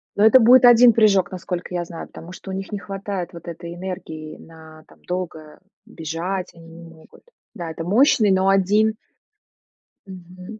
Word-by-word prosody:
Но 205 - +1
это 220 +4 +7
будет 250 +2 +6
1 240 0 +7
прыжок, 200 -5 +3
насколько 180 -1 -6
я 175 -1 -2
знаю, 170 -1 -9
потому 170 - -12
что 190 - -10
у - - -5
них 195 +1 -6
не 205 - -3
хватает 195 -2 -6
вот 170 0 -12
этой 170 0 -8
энергии 175 -4 -8
на 160 -1 -15
там - - -23
долго 165 -4 -6 0.3
бежать, 175 +4 -5
они 165 -1 -16
не 165 +1 -13
могут. 165 -1 -17 0.3
Да, 170 -5 -6
это 165 - -7
мощный, 215 - +3
но 190 0 +2
1 205 +3 +2 1.1
Мгм. 185 +3 -12
185 Hz, 170 wpm, -21 LUFS, 170-200 Hz, 1.1 s, это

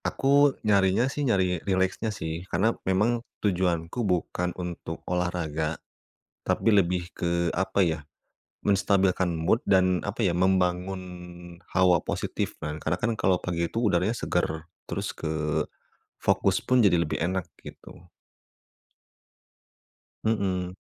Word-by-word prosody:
Aku 140 +1 +3
nyarinya 100 +2 +3
sih, 135 +2 -3
nyari 95 - +1
rileksnya 95 +3 0
sih. 80 -5 -4
Karena 105 +7 +2 0.2
memang 110 +5 +2 0.2
tujuanku 90 0 0
bukan 90 -3 0
untuk 85 -2 -6
olahraga, 85 -3 -1 0.7
tapi - - +1
lebih 90 -4 +2
ke, 85 0 0
apa 95 +3 0
ya, 80 -3 +1 0.6
menstabilkan 95 -2 +2
mood 85 +8 +1
dan, 95 -2 +3
apa 100 +4 -3
ya, 90 -5 +2
membangun 95 0 +1 0.7
hawa 90 -1 +5
positif. - - -2
Nah, 75 0 -4
karena 80 +2 -1
kan 115 - +1
kalau 95 -2 +2
pagi 85 -2 -1
itu 115 +7 -3
udaranya 100 -1 +2
segar. 80 -7 -2 0.2
Terus - - -3
ke, 80 0 -2 0.8
fokus - - +2
pun 125 0 +3
jadi 100 -6 +5
lebih 85 -3 -1
enak, 90 +2 0 0.2
gitu. - - -13 2.2
Heeh. 95 -5 0
90 Hz, 120 wpm, -27 LUFS, 85-100 Hz, 2.2 s, hawa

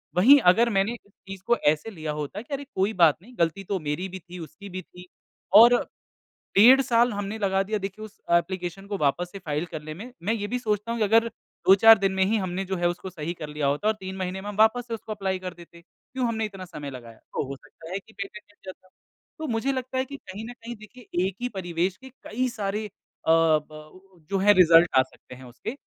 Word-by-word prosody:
वहीं 260 +11 +7
अगर 230 +6 +4
मैंने 200 +1 +1
इस 205 -4 -14 0.2
चीज़ 195 -1 -8
को 240 0 +3
ऐसे 155 +8 +2
लिया 160 -5 -5
होता 150 +7 -5
कि 280 - -9
अरे 280 +1 -3
कोई 195 +3 +1
बात 165 -4 +4
नहीं 245 +6 -16
ग़लती 170 +4 0
तो 195 0 -2
मेरी 155 +4 -3
भी 190 +1 -7
थी, 180 +1 -11
उसकी 170 +5 -10
भी 185 +1 -6
थी 180 +1 -15 0.5
और 235 +3 +9 0.8
डेढ़ 250 +7 +8
साल 240 -1 +3
हमने 205 +1 -4
लगा 195 -2 +1
दिया 215 +2 -2
देखिए 200 +2 -6
उस 215 - -16
एप्लीकेशन 180 +2 0
को 200 -1 -3
वापस 175 +3 0
से 195 - -8
फाइल 155 -3 -3
करने 155 0 -6
में। 220 +10 -9
मैं 210 +5 +1
ये 205 -2 -3
भी 250 +3 -2
सोचता 215 -1 -2
हूँ 235 - -2
कि - - +3
अगर 225 +2 +4 0.4
2-4 220 +4 +8
दिन 195 -1 +1
में 190 - +2
ही 220 +3 +1
हमने 190 -1 -3
जो 190 0 -3
है 175 - +1
उसको 180 +2 -5
सही 165 -1 -5
कर 155 -3 -8
लिया 150 -1 -1
होता 145 +9 0
और 215 - +4
3 190 0 -6
महीने 185 0 -4
में 205 - -8
हम 205 - -7
वापस 220 +3 +3
से 230 - -5
उसको 220 -1 -7
एप्लाई 195 -3 -2
कर 185 -1 -6
देते। 170 0 -15
क्यों 250 +7 -5
हमने 220 -1 -1
इतना 195 -3 -8
समय 145 -5 -8
लगाया? 115 -3 -11
तो - - -5
हो 140 - -5
सकता 160 +4 -14
है 195 - -2
कि 220 +3 -21
पेटेंट 200 +1 -7
मिल 205 - -31
जाता। 185 0 -24 0.5
तो 315 - -4
मुझे 230 +2 0
लगता 260 -1 -4
है 260 - +1
कि 280 +1 -8
कहीं 200 -2 -9
न - - -7
कहीं 240 0 -9
देखिए 215 -4 -5
एक 190 - -6
ही 245 - -1
परिवेश 180 -2 -2
के 265 - -13
कई 255 +4 -1
सारे 210 -1 -3
अ, 205 - -21 0.4
ब 160 -2 +3 0.2
उ 185 -1 -20
जो 195 - 0
है 205 +2 +6
रिज़ल्ट 170 -2 +7
आ - - +8
सकते 130 -1 -15
हैं 130 - -13
उसके 125 - -7
195 Hz, 245 wpm, -25 LUFS, 175-220 Hz, 0.8 s, और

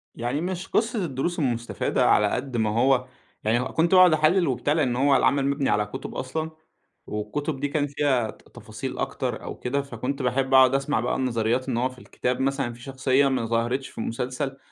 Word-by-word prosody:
يعني 120 +6 -2
مش 185 +1 -4
قصّة 225 -3 0
الدروس 160 +4 -2
المستفادة 120 - 0
على 105 - +4
قد 125 +3 -3
ما 110 -1 +1
هو 125 +3 +2 0.4
يعني 110 +3 +2
كنت 165 +5 0
باقعد 185 -2 +7
أحلِّل 155 +3 +3
وبتاع، 130 +3 0
لإن 135 -7 +1
هو 140 +2 +3
العمل 135 +1 +3
مبني 140 0 0
على 105 0 +2
كُتُب 105 - -7
أصلًا، 155 +5 -3 0.6
والكُتُب 135 +8 -3
دي 145 - 0
كان 145 0 0
فيها 135 -5 0
ت-تفاصيل - - -8
أكتر - - -3
أو - - -6
كده، 140 +3 -1
فكنت 135 +1 -4
باحب 130 +2 0
أقعد 130 0 +7
أسمَع 140 -3 0
بقى 120 - -1
النظريات 125 0 0
إن 115 - -1
هو 125 +2 +1
في 130 -1 -14
الكتاب 125 +1 -3
مثلًا 135 -3 -1
في 120 - -15
شخصية 135 +1 +1
ما 130 -4 0
ظهرتش 120 +4 -1
في - - -20
المسلسل، 130 +4 -3
130 Hz, 190 wpm, -25 LUFS, 120-145 Hz, 0.6 s, باقعد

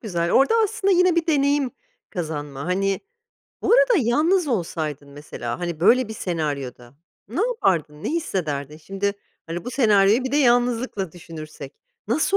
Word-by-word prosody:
güzel. 170 -6 -2
Orada 275 +12 +4
aslında 395 -2 0
yine 360 -1 +4
bir 335 - +1
deneyim 280 -3 +2 0.4
kazanma, 150 -5 -5
hani 195 +2 0 0.6
Bu - - +2
arada - - +5
yalnız 310 - +2
olsaydın 155 - -3
mesela, 130 -5 -6
hani, 170 -2 -4
böyle 230 +5 +4
bir 220 - -6
senaryoda 140 - -4 0.3
ne 255 - -3
yapardın, 165 - 0
ne - - -1
hissederdin? 155 - -3
Şimdi, 195 +5 -2 0.3
hani, 170 +5 -5
bu 245 - -4
senaryoyu 215 -1 +4
bir 260 - -3
de - - +2
yalnızlıkla 240 - +1
düşünürsek, 155 -5 -10 0.3
nasıl 315 - +2
195 Hz, 145 wpm, -23 LUFS, -, 0.6 s, arada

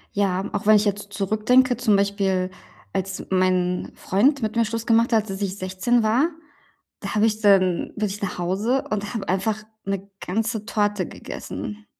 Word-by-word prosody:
Ja, 195 -1 +1
auch 205 0 -3
wenn 215 - +8
ich 210 +1 +3
jetzt 205 0 -2
zurückdenke. 220 +6 +3
Zum 230 -4 +3
Beispiel, 195 -2 +1 0.4
als 190 0 -3
mein 185 -1 +1
Freund 255 +7 +2
mit 215 +1 -2
mir 230 - +4
Schluss 230 +1 -3
gemacht 230 +1 +3
hat, 220 -2 +2
als 195 +1 -5
ich 195 -1 -2
16 190 +5 +1
war, 245 +10 +3 0.7
da - - -4
habe 210 +1 +4
ich 220 0 0
dann 185 -4 +3
bin 215 -1 0
ich 200 +1 -6
nach 195 -3 -3
Hause 200 +9 0
und 205 +1 -2
habe 220 - -4
einfach 210 +3 0 0.2
'ne 195 0 -3 0.2
ganze 220 +2 -2
Torte 205 -3 0
gegessen. 215 -3 -7
205 Hz, 175 wpm, -23 LUFS, 190-220 Hz, 0.7 s, wenn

